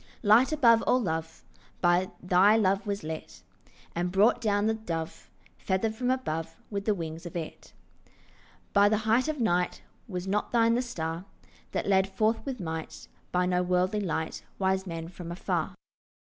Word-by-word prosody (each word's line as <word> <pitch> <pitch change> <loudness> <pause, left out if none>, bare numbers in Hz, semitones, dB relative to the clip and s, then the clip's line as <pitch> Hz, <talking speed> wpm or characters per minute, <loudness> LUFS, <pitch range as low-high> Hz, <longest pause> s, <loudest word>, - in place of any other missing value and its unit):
Light 225 +6 +5
above 235 -7 +5
all 255 - +4
love 160 -6 -3 0.4
By 175 +1 +3
thy 190 +4 +5
love 195 -1 +1
was 200 -3 -2
lit, 160 0 -7 0.5
And 175 +1 -1
brought 205 +6 +4
down 205 -2 +1
the 220 - +2
Dove 165 -7 -5 0.3
Feathered 200 +3 0
from 245 +3 -2
above 165 -12 -2 0.2
With 200 -1 -3
the 215 - +2
wings 165 -1 -6
of 175 - -10
it. 165 -2 -6 1.0
From 200 0 +6
the 215 - +2
height 220 +5 +2
of 310 -2 -2
night, 180 -6 0 0.2
Was 180 -4 -4
not 200 +2 -1
thine 230 -1 +4
the 240 - +2
star 165 -7 -4 0.5
That - - -1
led 195 -1 +3
forth 215 +3 +1
with 260 -3 -3
might 160 -3 -6 0.2
By 180 0 +2
no 180 0 +1
worldly 180 +3 +1
light 160 -4 -3
Wise 190 0 0
men 165 -1 -5
from 175 -1 -8
afar? 175 - -2
190 Hz, 165 wpm, -28 LUFS, 175-220 Hz, 1.0 s, From